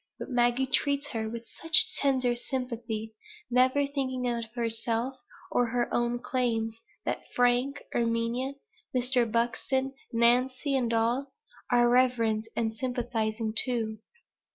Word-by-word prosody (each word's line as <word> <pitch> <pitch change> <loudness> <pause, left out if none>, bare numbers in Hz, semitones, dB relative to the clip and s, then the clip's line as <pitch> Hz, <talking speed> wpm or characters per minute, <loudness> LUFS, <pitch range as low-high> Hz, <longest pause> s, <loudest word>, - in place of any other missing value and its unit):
But - - -7
Maggie 245 +1 +2
treats 280 +2 +1
her 220 -3 -3
with 235 +1 -7 0.2
such 325 -1 +6
tender 260 -3 +2
sympathy, 235 -3 -4 0.4
never 255 +3 +4
thinking 260 -3 -2
of 235 -1 -1
herself 230 +1 -1 0.4
or 245 - +2
her 240 +1 -1
own 240 0 +1
claims, 235 -3 -1 0.3
that - - -4
Frank, 245 +3 +2
Erminia, 235 +3 0 0.4
Mr. 250 -2 +2
Buxton, 245 +4 0 0.2
Nancy, 255 +4 +2
and 245 -3 +1
all, 240 +4 0 0.4
are 240 0 +5
reverent 235 -3 +2
and 225 -1 0
sympathizing 225 -2 -2
too. 225 -4 +1
240 Hz, 120 wpm, -28 LUFS, 230-260 Hz, 0.4 s, such